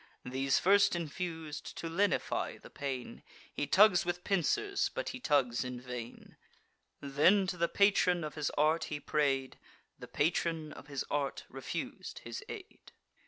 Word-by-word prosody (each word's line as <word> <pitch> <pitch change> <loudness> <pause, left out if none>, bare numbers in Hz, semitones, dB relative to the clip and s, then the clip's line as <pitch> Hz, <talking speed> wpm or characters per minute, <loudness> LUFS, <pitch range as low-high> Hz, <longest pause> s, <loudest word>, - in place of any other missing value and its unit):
These 130 +2 +1
first 200 +2 +5
infus'd, 160 -2 -5
to 165 - -4
lenify 195 +5 0
the - - -14
pain, 135 -3 -5 0.3
He 145 - -2
tugs 190 +2 +6
with 175 0 -3
pincers, 395 - +1
but - - -4
he 255 - -6
tugs 135 - +2
in 125 -1 -5
vain. 125 -2 -8 0.6
Then 150 +8 +4
to 185 0 -2
the 170 -1 +1
patron 180 -2 +3
of 150 - -4
his 150 -2 -1
art 155 +3 +3
he 150 - -4
pray'd: 135 -3 0 0.4
The - - -9
patron 160 0 0
of - - -12
his 140 -2 -3
art 140 -1 -1
refus'd - - -5
his - - -6
aid. 410 -2 -10
155 Hz, 150 wpm, -32 LUFS, 140-180 Hz, 0.6 s, tugs